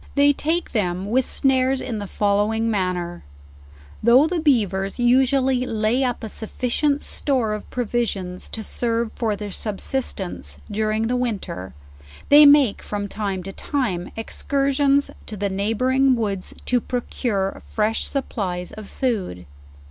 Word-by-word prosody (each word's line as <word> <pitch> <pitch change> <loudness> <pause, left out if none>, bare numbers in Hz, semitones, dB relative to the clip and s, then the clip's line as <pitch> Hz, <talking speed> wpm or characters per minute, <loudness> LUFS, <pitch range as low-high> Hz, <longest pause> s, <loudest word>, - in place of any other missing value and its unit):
They 285 0 +5
take 325 +5 -1
them 190 -2 -1
with 260 +1 +2
snares 265 0 +2
in 230 -5 -4
the 205 - -5
following 210 +3 +1
manner* 180 -3 -2 0.8
though 245 +6 +6
the 340 +1 -1
beavers 200 - +1
usually 260 +1 +3
lay 225 +4 +1
up 245 -3 -1
a - - -3
sufficient, 255 +7 -1
store 250 -7 0
of 210 - -6
provi 240 -1 0
sions 185 -4 -5
to 220 - -5
serve 230 0 -1
for 220 -3 -1
their 205 0 -6
subsistence 195 - -3
during 215 +1 0
the 245 +2 0
winter, 210 - -3 0.5
they 290 +1 +9
make 285 -7 +5
from 205 -1 -4
time 200 -3 -3
to 195 - -6
time 205 -12 -2
excursions 275 +4 +1 0.2
to 215 - -5
the 200 +1 -1
neighboring 255 +7 +2
woods 200 -5 -3
to 245 -1 +2
procure 225 -5 -2
fresh 220 +1 +1
supplies 185 -10 -3
of 215 -2 -10
food. 195 - -2
225 Hz, 140 wpm, -22 LUFS, 200-260 Hz, 0.8 s, they